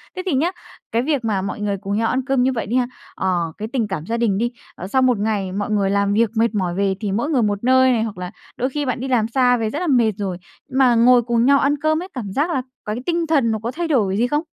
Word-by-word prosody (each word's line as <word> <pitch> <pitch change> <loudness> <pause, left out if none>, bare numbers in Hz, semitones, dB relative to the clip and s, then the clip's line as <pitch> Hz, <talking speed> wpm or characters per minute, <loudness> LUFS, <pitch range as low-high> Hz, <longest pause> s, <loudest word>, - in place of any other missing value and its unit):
Thế 370 - -3
thì 365 - 0
nhá, 310 +7 +1 0.4
cái 230 - +1
việc 275 -2 -1
mà 205 -4 0
mọi 195 +2 -4
người 200 -1 -1
cùng 200 +1 -3
nhau 225 +1 +1
ăn 260 - 0
cơm 270 -2 +2
như 265 - +2
vậy 230 - -3
đi 230 - -2
ha, 250 -1 +2 0.3
ờ, 175 -3 -1
cái 215 - -4
tình 230 -5 0
cảm 170 -5 -4
gia 230 +3 -2
đình 220 -5 +1
đi, 240 +2 0 0.2
ờ 185 - -7
sau 260 +6 +1
1 250 -4 +3
ngày 205 -3 -1
mọi 200 +2 -3
người 200 -2 +1
làm 200 0 +1
việc 225 +1 +3
mệt 225 -1 +2
mỏi 180 -3 0
về 195 0 +1
thì 205 -3 -2
mỗi 235 +9 -1
người 275 -6 +2
một 205 -1 -1
nơi 260 +1 +5
này, 230 -3 +1
hoặc 215 -4 -5
là 180 +1 -6 0.3
đôi 255 - 0
khi 290 +2 -3
bạn 255 -2 -2
đi 265 - -4
làm 240 -4 +2
xa 245 +1 +3
về 225 -2 -1
rất 290 - -4
là 360 - -2
mệt 240 -6 +3
rồi, 190 -4 -3 0.3
mà 260 -2 +4
ngồi 245 +1 +6
cùng 235 0 +1
nhau 280 +1 +5
ăn 280 +2 +2
cơm 315 +1 +1
ấy, 365 - -6
cảm 215 -7 -5
giác 295 - +1
là 270 -6 0
c - - -18 0.2
cái 210 - -2
tinh 340 -1 0
thần 280 -8 +2
nó 220 - -1
có 235 - -2
thay 340 +4 -3
đổi 210 -10 +1
gì 240 +3 +2
không? 295 +5 0
235 Hz, 300 wpm, -20 LUFS, 205-265 Hz, 0.4 s, ngồi